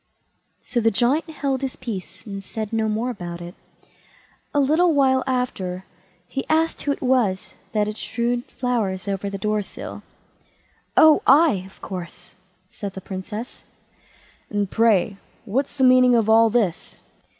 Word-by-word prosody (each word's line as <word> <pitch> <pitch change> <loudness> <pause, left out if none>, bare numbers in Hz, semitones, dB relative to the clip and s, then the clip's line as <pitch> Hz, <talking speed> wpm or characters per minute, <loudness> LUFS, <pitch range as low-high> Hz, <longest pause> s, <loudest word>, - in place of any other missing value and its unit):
So 240 - -2
the 225 -1 +3
Giant 245 - +1
held 275 -4 -2
his 270 -1 -3
peace, 215 -7 -7
and 200 -2 -6
said 220 +2 -5
no 220 -1 +1
more 225 +4 -1
about 175 -6 -7
it. 175 0 -8 1.0
A 290 - +1
little 315 +4 +3
while 260 -2 +3
after, 190 -8 -2 0.4
he 270 - -3
asked 320 +1 +1
who 290 - 0
it 280 - -4
was 245 -8 +1 0.2
that 210 -1 +2
had 210 +1 -5
strewed 240 +1 -1
flowers 215 -7 -2
about 200 0 -2
the 200 - -4
door 210 +2 0
sill. 195 - -8 1.0
"Oh, 315 -1 +7
I, 275 - +5
of 195 - -20
course", 180 -1 -8 0.3
said 200 +1 -7
the 190 - -6
Princess. 210 +6 -7 0.9
"And, 205 -2 -1
pray, 215 -3 +3 0.3
what's 270 +7 -2
the 265 - +2
meaning 255 -1 +6
of 225 -2 +2
all 225 +1 +6
this?" 215 -7 -1
225 Hz, 150 wpm, -23 LUFS, 195-260 Hz, 1.0 s, Oh